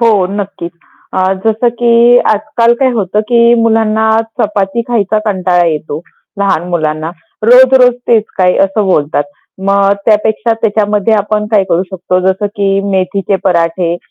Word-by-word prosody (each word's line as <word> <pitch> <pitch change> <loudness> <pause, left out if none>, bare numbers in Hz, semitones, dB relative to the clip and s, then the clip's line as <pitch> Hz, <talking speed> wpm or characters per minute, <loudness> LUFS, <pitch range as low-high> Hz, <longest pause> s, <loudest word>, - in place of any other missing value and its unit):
हो, 215 -5 +2
नक्कीच. 190 -4 -6 0.4
अ, 185 0 +1
जसं 225 +2 +1
की 235 0 +4 0.2
आजकाल 235 +1 0
काय 265 - +3
होतं, 210 -2 -1
की 235 +2 +3
मुलांना 220 -1 +1 0.3
चपाती 205 +1 -1
खायचा 215 -3 0
कंटाळा 185 -3 +1
येतो, 155 -1 -3 0.4
लहान 195 -4 -1
मुलांना. 155 -2 -2 0.3
"रोज-रोज 250 +1 +5
तेच 225 -3 +3
काय?" 180 -1 +3
असं 195 +1 -2
बोलतात. 150 -5 0 0.4
मग 200 0 +2
त्यापेक्षा 220 +1 +1
त्याच्यामध्ये 210 0 +1
आपण 210 0 -1
काय 205 -3 +2
करू 170 - +1
शकतो, 185 0 -2
जसं 190 +2 -2
की 195 -1 0
मेथीचे 190 +1 -1
पराठे 170 -1 0
205 Hz, 135 wpm, -11 LUFS, 185-225 Hz, 0.4 s, रोज-रोज